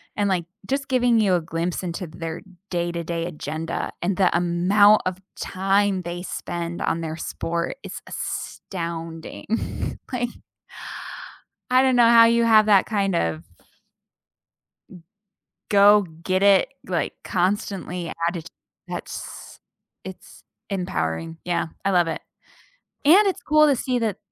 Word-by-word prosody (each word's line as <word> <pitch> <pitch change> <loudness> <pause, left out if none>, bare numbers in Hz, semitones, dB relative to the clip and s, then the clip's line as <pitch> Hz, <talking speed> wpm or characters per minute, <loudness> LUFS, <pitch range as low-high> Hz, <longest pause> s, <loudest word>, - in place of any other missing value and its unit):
And, 205 -1 +1
like, 180 -3 0 0.2
just 275 +1 -1
giving 245 -3 +3
you 190 -3 +3
a 175 - +1
glimpse 165 +3 -3
into 175 +1 -4
their 165 +1 -6 0.3
day 175 -1 -1
to 170 0 -4
day 165 0 -3
agenda, 160 0 -4
and 180 +1 0
the 185 -3 +3
amount 185 +5 +4
of 185 0 -2 0.2
time 195 0 +1
they 175 0 -5
spend 170 -2 -5
on 165 - 0
their 160 -1 -4
sport 170 +6 -3
is - - -7
astounding, 165 +4 -5
like 245 -1 -1 1.4
I 255 +1 +5
don't 260 -1 +3
know 240 -1 +6
how 230 0 +8
you 235 0 +4
have 215 -2 +6
that 200 -3 +5
kind 200 -4 0
of 80 - -1 1.5
M 180 -3 -14 0.7
go 205 0 +6 0.2
get 185 +1 0
it, 200 -1 +5 0.2
like, 175 -3 -1
constantly 180 -2 -1 0.2
added, 170 -2 -5 0.4
that's - - -7 0.4
it's - - -11 0.3
empowering, 165 - -2
yeah, 175 -2 -1 0.2
I 195 - +2
love 175 -3 +3
it. 165 - -3 0.8
And 370 +8 +7
it's 385 - -1
cool 305 +1 +5
to 280 - +3
see 250 0 -1
that 220 -4 -1
185 Hz, 135 wpm, -23 LUFS, 170-215 Hz, 1.5 s, how